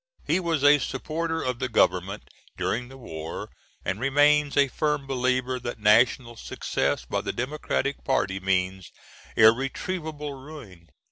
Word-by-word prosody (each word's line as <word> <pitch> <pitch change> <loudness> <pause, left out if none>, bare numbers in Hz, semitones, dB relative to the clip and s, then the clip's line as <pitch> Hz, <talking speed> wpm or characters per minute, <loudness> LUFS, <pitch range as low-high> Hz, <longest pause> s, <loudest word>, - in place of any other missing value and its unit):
He - - +2
was 165 -5 -1
a 145 0 +7
supporter 160 +5 -3
of 125 -2 -2
the 130 - -2
Government 95 -2 +1 0.3
during 120 +2 -1
the 135 - -12
war, 80 -10 -7 0.3
and 95 - -2
remains 145 +2 +3
a 140 -1 +5
firm 150 +1 -1
believer, 130 -1 0
that 120 0 -5
national 115 +3 +3
success - - -2
by - - -2
the - - -3
Democratic 140 +1 -2
party 95 -8 0
means 95 0 -1 0.4
irretrievable 145 +6 +1
ruin. 130 - -12
130 Hz, 135 wpm, -26 LUFS, 110-145 Hz, 0.4 s, a